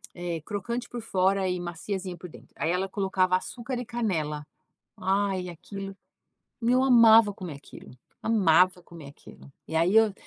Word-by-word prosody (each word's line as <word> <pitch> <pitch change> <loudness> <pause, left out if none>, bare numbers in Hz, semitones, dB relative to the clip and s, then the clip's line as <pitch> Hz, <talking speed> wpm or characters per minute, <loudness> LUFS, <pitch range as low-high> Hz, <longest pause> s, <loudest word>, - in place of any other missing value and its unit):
eh, 175 -2 -4
crocante 235 +6 -4
por 240 - -6
fora 190 -2 +1
e 180 0 -1
maciazinha 180 +1 -5
por 180 - -10
dentro, - - -16
aí 165 - 0
ela 190 +2 -1
colocava 185 -2 +1
açúcar 240 +7 -4
e 245 - -5
canela. 160 -11 -2 0.5
Ai, 190 -1 0
aquilo 195 +3 -8 0.7
meu, 245 +2 +3
eu - - +3
amava 230 -4 +7
comer 180 -6 -7
aquilo, 140 - -13 0.3
amava 185 -4 +3
comer 165 -4 -12
aquilo! 140 0 -16 0.2
E 160 - -5
aí 170 +5 +3
eu 220 -3 +4
190 Hz, 160 wpm, -27 LUFS, 175-220 Hz, 0.7 s, amava